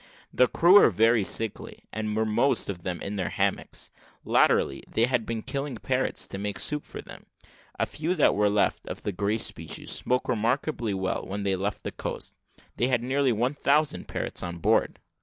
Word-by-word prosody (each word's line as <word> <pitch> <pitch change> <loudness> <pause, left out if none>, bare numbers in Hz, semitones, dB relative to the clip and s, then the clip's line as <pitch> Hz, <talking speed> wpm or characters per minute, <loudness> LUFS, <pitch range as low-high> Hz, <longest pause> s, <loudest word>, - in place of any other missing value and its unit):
The 125 - +5
crew 180 +9 +6
were - - +6
very 115 +2 +3
sickly, 110 +2 -3
and 110 0 -2
were 110 0 +1
most 110 +4 +2
of 90 -3 -4
them 90 0 -4
in 100 +1 -4
their 95 - -1
hammocks. - - -1 0.3
Latterly, 70 - +3
they 115 - +3
had 125 -3 -1
been 115 -2 -3
killing 140 -1 -3
parrots - - 0
to 95 - -5
make 105 -1 -3
soup 150 -1 0
for - - -9
them; - - -13 0.5
a - - +1
few 160 +4 -2
that 155 - +4
were 105 0 +2
left, 105 0 +1
of - - -6
the 105 - -1
grey 100 +3 0
species, - - -3
spoke 125 0 0
remarkably 120 -1 0
well. 95 0 -2
When 100 +1 -4
they 100 -1 +1
left 100 +2 -3
the - - -4
coast, - - -6 0.4
they 120 - +2
had 125 -2 +1
nearly 135 +1 +2
one 120 +5 0
thousand 150 +1 +1
parrots - - -2
on 85 -1 -5
board. 85 - +2
110 Hz, 195 wpm, -27 LUFS, 100-130 Hz, 0.5 s, crew